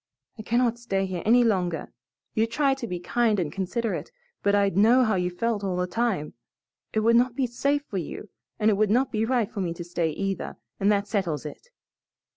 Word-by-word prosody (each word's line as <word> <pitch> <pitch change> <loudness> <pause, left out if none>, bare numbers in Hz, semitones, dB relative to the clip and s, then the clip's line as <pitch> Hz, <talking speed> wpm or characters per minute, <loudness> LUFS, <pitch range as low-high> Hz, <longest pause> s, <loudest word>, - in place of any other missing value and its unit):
I - - -3
cannot 235 +1 +1
stay 195 -5 -1
here 185 -2 -4
any 240 +2 +6
longer. 180 -8 0 0.4
You'd 225 +1 +1
try 275 +3 +2
to 270 -3 -5
be 180 -3 -4
kind 220 +3 +1
and 160 -5 -1
considerate, 205 +6 -3 0.3
but 200 0 +3
I'd 200 -3 +2
know 230 +6 +5
how 220 -3 +2
you 180 -1 0
felt 210 +3 -2
all 190 -2 -1
the 180 - +1
time. 195 -6 -1 0.6
It 220 - +1
would 230 +2 +4
not 245 0 +3
be 265 - +1
safe 280 +4 0
for 195 - -3
you 180 +5 -7 0.3
and 215 0 +3
it 200 - +1
would 215 0 +2
not 250 +5 +2
be 220 0 0
right 235 -3 0
for 205 - -4
me 170 -2 -2
to 175 - -6
stay, 170 -1 -1
either, 195 +5 -3 0.2
and 200 +2 +3
that 200 0 +1
settles 175 -9 -1
it. 150 - -9
210 Hz, 215 wpm, -26 LUFS, 185-235 Hz, 0.6 s, any